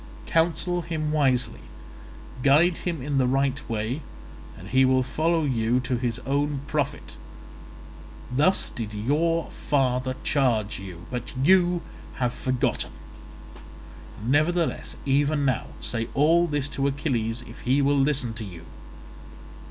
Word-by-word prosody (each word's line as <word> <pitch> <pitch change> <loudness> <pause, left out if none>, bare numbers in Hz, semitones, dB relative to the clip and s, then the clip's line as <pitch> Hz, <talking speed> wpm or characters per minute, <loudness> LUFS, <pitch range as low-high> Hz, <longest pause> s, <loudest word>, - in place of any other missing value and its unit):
Counsel 175 +2 +1
him 155 -2 -3
wisely, 135 -5 +1 0.8
guide 155 +6 +4
him 165 -7 -3
in 140 0 0
the 130 - +3
right 135 +1 +1
way, 115 +6 -2 0.6
and 95 +4 -10
he 130 +3 +4
will 130 0 +4
follow 160 +5 +1
you 120 -3 +1
to 130 0 -1
his 120 -1 -1
own 140 0 0
profit.' 145 -1 -3 1.2
Thus 150 +8 +2
did 110 -2 -5
your 160 +9 0
father 130 -2 0
charge 115 -9 +1
you, 90 -3 -9
but 125 -1 -5
you 175 +4 +4 0.3
have 125 -1 -1
forgotten; 130 - -1 1.3
nevertheless, 155 +6 +1
even 145 +1 +2
now, 130 - 0
say 115 -1 -2
all 165 +5 +4
this 145 -3 -1
to 140 0 -1
Achilles 125 -5 -1
if - - -11
he 130 +3 +2
will 140 +1 +3
listen 135 -4 +2
to 115 - -6
you. 85 -5 -9
135 Hz, 130 wpm, -25 LUFS, 125-150 Hz, 1.3 s, guide